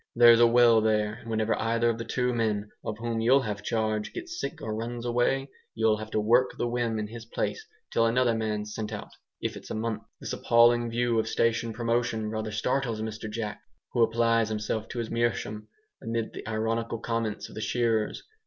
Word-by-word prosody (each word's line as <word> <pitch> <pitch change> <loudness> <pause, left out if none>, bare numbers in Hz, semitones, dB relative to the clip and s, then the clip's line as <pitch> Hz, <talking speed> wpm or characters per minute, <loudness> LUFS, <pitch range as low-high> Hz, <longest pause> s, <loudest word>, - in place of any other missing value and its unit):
"There's 120 -1 +8
a 120 - +7
well 115 -1 +6
there, 105 -1 +1
and 115 +1 -11
whenever 110 0 +1
either 115 +1 +1
of 115 -1 0
the 115 - -4
two 125 +2 0
men, 105 -3 -1
of 105 - -4
whom 115 0 -2
you'll 130 +4 +5
have 105 -2 -3
CHARGE, 110 0 -1
gets 355 0 -6
sick 165 - -4
or 110 -7 -4
runs 115 +2 -4
away, 125 +3 +1 0.2
you'll 110 -1 +3
have 110 0 -7
to 110 - 0
work 120 +4 +3
the 120 - 0
whim 120 -2 -1
in 105 - -2
his 115 +1 -9
place, 440 - -3 0.3
till 115 0 +3
another 120 +1 +3
man's 105 -1 -2
sent 110 -1 -4
out, 105 -1 -6 0.3
if - - -2
it's - - -10
a - - -3
month." 110 0 -2 0.2
This - - -5
appalling 120 0 +4
view 120 0 +1
of 110 - 0
station 115 0 +1
promotion 115 -1 -1
rather 110 0 -3
startles 115 +1 -1
Mr 110 0 -5
Jack, 105 -1 -4 0.3
who 120 - +2
applies 115 0 +3
himself 110 0 -2
to - - -8
his 115 -2 -3
meerschaum, 115 -2 -1 0.3
amid 115 0 -3
the - - -8
ironical 115 +1 -1
comments 115 -2 -2
of - - -13
the 110 - -6
shearers. 115 -2 0
115 Hz, 200 wpm, -28 LUFS, 110-120 Hz, 0.3 s, There's